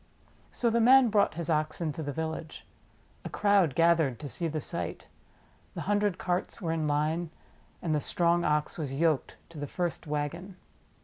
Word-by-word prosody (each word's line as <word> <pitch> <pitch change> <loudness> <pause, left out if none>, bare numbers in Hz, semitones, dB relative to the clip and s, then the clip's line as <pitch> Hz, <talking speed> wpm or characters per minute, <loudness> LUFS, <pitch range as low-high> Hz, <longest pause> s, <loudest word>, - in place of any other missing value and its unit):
So 235 -2 0
the 235 +1 +2
man 255 +1 +7
brought 205 -5 +2
his 170 -1 -4
Ox 155 -1 0
into 160 -2 -3
the 145 -2 -3
village. 160 +1 -5 0.6
A - - -5
crowd 200 -9 +3
gathered 165 -7 +3
to 145 - -5
see 165 +5 -3
the 155 -1 -2
sight. 85 - -5 0.7
The - - -4
hundred 205 -2 +1
carts 180 0 -2
were 170 -4 -2
in 160 -2 -1
line, 155 +3 0 0.5
and 165 -3 0
the 150 - +1
strong 175 +2 +1
Ox 150 +2 0
was 140 -4 -3
yoked 160 -4 +1
to 165 -3 -10
the 145 - -4
first 175 +1 -3
wagon. 150 +6 -3
165 Hz, 175 wpm, -29 LUFS, 150-180 Hz, 0.7 s, man